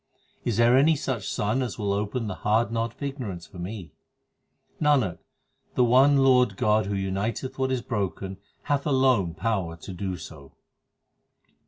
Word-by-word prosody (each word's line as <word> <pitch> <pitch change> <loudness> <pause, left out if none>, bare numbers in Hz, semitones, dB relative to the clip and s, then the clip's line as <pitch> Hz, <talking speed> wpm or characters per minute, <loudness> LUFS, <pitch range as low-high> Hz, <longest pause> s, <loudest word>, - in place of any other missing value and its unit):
Is 115 -4 -1
there 120 +1 +5
any 150 +4 +5
such 130 -7 -3
sun 105 +5 0
1 - - 0
as 125 - -3
will 100 -3 -1
open 105 +4 -2
the 105 - -3
hard 110 +3 +2
knot 115 0 -2
of - - -10
ignorance 120 - -5
for 90 - -13
me? 95 0 -6 0.9
Nanak, 135 - +2 0.6
the 125 - +4
one 130 +4 +5
Lord 125 -6 +4
God 105 0 +2
who 100 - -2
uniteth 100 +7 -3
what 130 0 +1
is 130 -2 -1
broken 95 -3 -3 0.2
hath 145 0 0
alone 130 - +2
power 95 -6 -1
to 90 +3 -9
do 95 0 -4
so. 80 -4 -11
110 Hz, 165 wpm, -26 LUFS, 95-130 Hz, 0.9 s, there